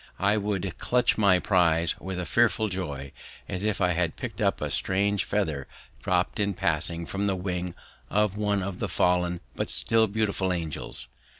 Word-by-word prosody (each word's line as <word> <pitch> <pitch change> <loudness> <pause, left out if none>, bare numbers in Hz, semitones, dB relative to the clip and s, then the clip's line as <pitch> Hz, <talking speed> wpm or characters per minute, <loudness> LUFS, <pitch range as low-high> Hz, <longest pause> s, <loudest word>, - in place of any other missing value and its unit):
I 100 +2 +2
would 100 -2 -2
clutch 125 0 +2
my 100 -4 +5
prize 85 -3 +3
with 95 -1 -5
a 90 - -3
fearful 110 +1 +2
joy, 70 -8 -4 0.4
as 90 - -4
if 105 -1 0
I 90 -2 +3
had 85 -1 0
picked - - -6
up - - +2
a - - -3
strange 100 +1 +1
feather 80 -10 -1 0.3
dropped 90 +2 0
in 100 -2 +1
passing 85 +1 0
from 100 +4 -2
the 95 - +1
wing 90 -1 -3 0.3
of 105 -1 +1
one 105 -2 0
of 95 -1 -5
the - - -2
fallen 90 -1 +1
but - - -2
still 115 -1 +4
beautiful 100 -3 0
angels. 80 -5 -4
95 Hz, 175 wpm, -27 LUFS, 90-100 Hz, 0.4 s, my